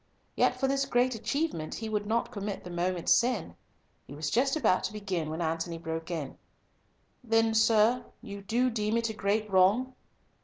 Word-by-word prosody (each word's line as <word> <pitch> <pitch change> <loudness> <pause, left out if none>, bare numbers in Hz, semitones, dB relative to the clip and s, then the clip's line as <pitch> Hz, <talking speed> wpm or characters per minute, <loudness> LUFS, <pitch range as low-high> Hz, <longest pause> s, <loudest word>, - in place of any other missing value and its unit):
Yet 250 - +2
for 270 - +2
this 275 0 0
great 250 +1 +2
achievement 230 - -2
He 225 - -5
would 210 -1 -2
not 230 +2 0
commit 200 -1 -5
the 180 - -8
moment's 175 0 +1
sin. 235 -7 0 0.5
He 140 - -9
was 150 0 -3
just 270 +4 +2
about 185 -12 +2
to 205 - -4
begin 190 -7 -3
when 160 +2 -3
Antony 165 +1 -2
broke 165 0 -5
in, 160 -6 -5 0.8
"Then, 225 -1 +2
sir, 225 +2 +4 0.2
you 200 -4 -8
do 240 +6 +1
deem 215 0 0
it 230 -1 0
a - - -7
great 210 +1 0
wrong?" 205 +7 +3
210 Hz, 180 wpm, -29 LUFS, 180-235 Hz, 0.8 s, sir